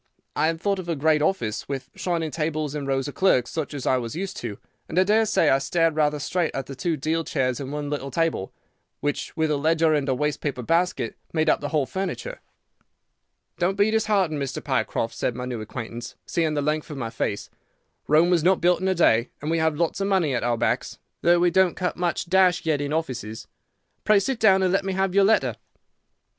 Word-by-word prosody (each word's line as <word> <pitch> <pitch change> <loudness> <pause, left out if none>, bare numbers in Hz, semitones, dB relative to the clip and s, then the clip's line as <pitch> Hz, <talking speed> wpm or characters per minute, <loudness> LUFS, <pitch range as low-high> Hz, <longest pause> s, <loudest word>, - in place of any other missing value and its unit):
I 155 - +2
had 165 0 -1
thought 200 +1 0
of 175 -2 -6
a 165 - 0
great 155 +1 +2
office 135 - -1
with 135 -1 -5
shining 165 -3 -2
tables 155 -2 -2
and 145 -2 -4
rows 135 0 0
of 145 - -6
clerks, 130 -10 +2
such 160 -3 -3
as 135 - -5
I 130 - +3
was 120 +1 -4
used 190 +3 -4
to, 110 -4 -5 0.3
and 160 - -5
I 185 - +6
daresay 210 -4 +3
I 135 - +4
stared 165 +2 +1
rather 150 -1 +2
straight 165 +4 -1
at 135 - -3
the 140 - -8
two 165 +3 -2
deal 160 +4 -1
chairs 130 -6 -1
and 135 -1 -5
one 145 0 -3
little 140 -2 -3
table, 160 -8 -1 0.5
which, 145 +3 -3
with 160 -1 +1
a 150 - +1
ledger 160 +2 +2
and 145 -2 0
a 130 - +2
waste 150 +2 -1
paper 130 -4 -3
basket, 165 -5 0 0.2
made 155 -1 +3
up - - 0
the 145 - -3
whole 150 -4 +1
furniture. 195 - -4 1.2
"'Don't 185 +2 +1
be 205 +2 +3
disheartened, 205 -9 +1
Mr. 135 -1 -4
Pycroft,' 130 -4 -1
said 125 - -2
my 125 0 -4
new 125 -3 -4
acquaintance, 120 +1 -7
seeing 160 -3 0
the 145 - 0
length 150 +1 -1
of 150 - -6
my 115 -4 -4
face. 105 -3 -3 0.6
'Rome 160 +4 +4
was 170 -3 +3
not 185 +1 +4
built 175 +1 +2
in 190 - 0
a 190 - +2
day, 115 -8 +3
and 150 +2 -3
we 165 - +1
have 160 -2 +1
lots 170 +3 -1
of 195 - 0
money 185 -8 +2
at 125 - -1
our 120 -1 +1
backs, 115 - -1 0.2
though 175 +1 +5
we 175 0 +3
don't 190 -1 +3
cut 180 -1 -1
much 175 -1 -1
dash 180 -1 +3
yet 155 -3 +1
in 145 0 -3
offices. 125 -9 -3 0.6
Pray 210 -1 +5
sit 245 +4 -2
down, 190 -3 +5
and 185 0 +2
let 195 +1 +2
me 195 0 -2
have 190 -1 0
your 200 0 +5
letter. 220 +2 +2
155 Hz, 225 wpm, -24 LUFS, 135-180 Hz, 1.2 s, I